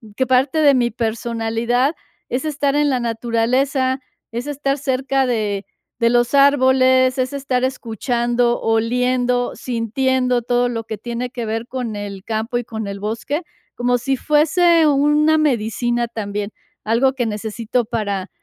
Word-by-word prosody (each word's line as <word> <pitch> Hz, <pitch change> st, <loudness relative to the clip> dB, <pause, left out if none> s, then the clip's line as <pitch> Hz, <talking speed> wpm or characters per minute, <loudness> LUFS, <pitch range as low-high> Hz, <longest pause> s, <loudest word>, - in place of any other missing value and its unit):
que 260 Hz, +2 st, 0 dB
parte 265 Hz, +4 st, +2 dB
de 285 Hz, -2 st, +6 dB
mi 240 Hz, -1 st, +1 dB
personalidad 235 Hz, +3 st, -1 dB, 0.3 s
es 255 Hz, +4 st, -2 dB
estar 290 Hz, -2 st, 0 dB
en 295 Hz, 0 st, +3 dB
la 255 Hz, -, +1 dB
naturaleza, 245 Hz, +3 st, 0 dB, 0.3 s
es 235 Hz, +2 st, -4 dB
estar 280 Hz, -1 st, -1 dB
cerca 270 Hz, 0 st, 0 dB
de 210 Hz, -5 st, -1 dB, 0.4 s
de 230 Hz, -, +4 dB
los 240 Hz, +1 st, +2 dB
árboles, 260 Hz, -2 st, +4 dB
es 255 Hz, +1 st, -1 dB
estar 270 Hz, -2 st, -1 dB
escuchando, 240 Hz, -1 st, -1 dB
oliendo, 245 Hz, +2 st, +1 dB
sintiendo 250 Hz, +1 st, 0 dB
todo 245 Hz, +1 st, +1 dB
lo 230 Hz, -2 st, -4 dB
que 220 Hz, -1 st, -5 dB
tiene 240 Hz, +3 st, -4 dB
que 240 Hz, -2 st, -5 dB
ver 225 Hz, +2 st, -3 dB
con 245 Hz, -5 st, -4 dB
el 200 Hz, -2 st, -6 dB
campo 225 Hz, +2 st, -2 dB
y 240 Hz, -, -2 dB
con 220 Hz, -2 st, -6 dB
el 200 Hz, 0 st, -5 dB
bosque, 230 Hz, +9 st, -3 dB, 0.3 s
como 245 Hz, 0 st, +1 dB
si 270 Hz, +3 st, -1 dB
fuese 320 Hz, +4 st, +3 dB
una 295 Hz, +2 st, +3 dB
medicina 240 Hz, -4 st, 0 dB
también, 210 Hz, -2 st, -4 dB, 0.3 s
algo 235 Hz, +5 st, +2 dB
que 255 Hz, -2 st, -1 dB
necesito 220 Hz, +2 st, -2 dB
para 205 Hz, -4 st, -3 dB
245 Hz, 145 wpm, -19 LUFS, 225-265 Hz, 0.4 s, de